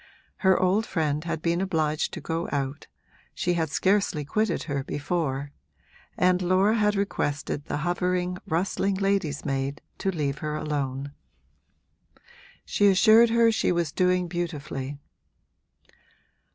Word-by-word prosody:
Her 190 -1 +3
old 195 +4 +2
friend 155 -3 -1
had 165 -2 -3
been 170 +1 +1
obliged 155 -5 0
to - - -6
go 165 +1 -3
out 140 -1 -3 0.5
she 175 - 0
had 165 -2 0
scarcely 190 -3 +1
quitted 210 +3 0
her 140 -3 -3
before 145 -2 -2 0.7
and 180 0 +3
Laura 185 +4 +3
had 210 -2 +2
requested 145 -7 -2
the - - -3
hovering, 180 +1 -1
rustling 190 +4 0
lady's 195 -7 0
maid 135 0 -2 0.2
to 195 - 0
leave 145 -6 -2
her 150 -1 -3
alone: 140 -2 -3 1.5
she 205 - +3
assured 220 +4 +6
her 230 0 +4
she 220 - +1
was 170 -3 0
doing 180 0 +1
beautifully. 150 -5 -4
170 Hz, 125 wpm, -26 LUFS, 145-190 Hz, 1.5 s, assured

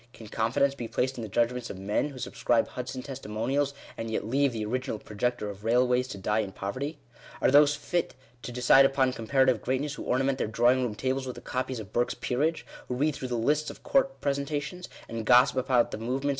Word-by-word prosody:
Can 110 -2 -12
confidence 115 +6 +1
be 120 -4 -6
placed 130 +2 -1
in - - -3
the 110 - -4
judgments 120 +3 0
of - - -6
men 105 +9 -1
who 140 - -10
subscribe 120 -2 0
Hudson 130 0 -5
testimonials, 135 +2 -2 0.2
and 115 - -5
yet 110 - -2
leave 135 +4 +2
the 110 -2 -3
original 125 +1 -2
projector 105 +2 -2
of 100 0 -8
railways 125 +2 +2
to 100 - -7
die 105 +3 0
in 100 -3 -3
poverty? 130 - -4 0.4
Are - - +3
those 145 +1 +6
fit 155 +2 -2 0.3
to 125 - -6
decide 125 +2 +6
upon 135 -1 +2
comparative 130 +1 +2
greatness 130 +3 -1
who - - -7
orna 130 +2 +1
ment 135 0 0
their - - 0
drawing 120 +4 +3
room 120 -4 -2
tables 130 +3 -1
with 125 - -6
a - - -8
copy 130 +1 -3
of 100 -3 -10
Burke's 120 +1 +1
Peerage; 155 +6 -1 0.2
who 125 - -2
read 150 +4 +1
through 130 - -5
the 125 - -2
lists 150 +6 +1
of - - -11
court 270 0 +1
presentations, 145 +5 -2 0.2
and 115 -1 -4
gossip 125 +3 +5
about 125 -2 +2
the - - -5
movements. 130 +5 -1
125 Hz, 215 wpm, -28 LUFS, 115-140 Hz, 0.4 s, those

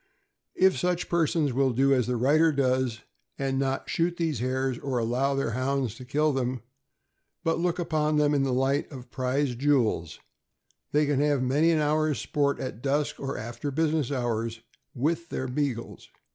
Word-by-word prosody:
If 190 0 +3
such 180 -1 -1
persons 160 -4 +1
will 135 +1 +2
do 135 +3 +3
as 125 -3 +1
the 125 - 0
writer 150 +7 +4
does, 130 -4 0 0.4
and 135 -1 -1
not 135 0 -1
shoot 175 +1 0
these 160 -7 -1
hares, 130 0 -1
or 135 -3 -2
allow 125 +4 0
their 135 -4 -1
Hounds 130 -1 -1
to 130 - -10
kill 150 +3 +1
them, 125 -2 -2 0.8
but 165 -1 +1
look 175 0 0
upon 155 -3 0
them 150 0 +3
in 140 - +2
the 135 -1 +1
light 135 +4 0
of 125 -3 -10
prized 130 -1 -1
jewels, 115 - +1 0.7
they 150 +1 +3
can 145 -2 +1
have 145 -2 +2
many 145 +6 +3
an 165 - +3
hour's 150 -3 +1
sport, 140 +5 0
at 125 -3 -5
dusk 145 +2 -1
or 135 0 -4
after 120 +6 -5
business 155 -1 0
hours, 115 -3 -2 0.3
with 160 +6 -1
their 130 - -3
Beagles. 125 -3 -3
135 Hz, 175 wpm, -27 LUFS, 125-150 Hz, 0.8 s, writer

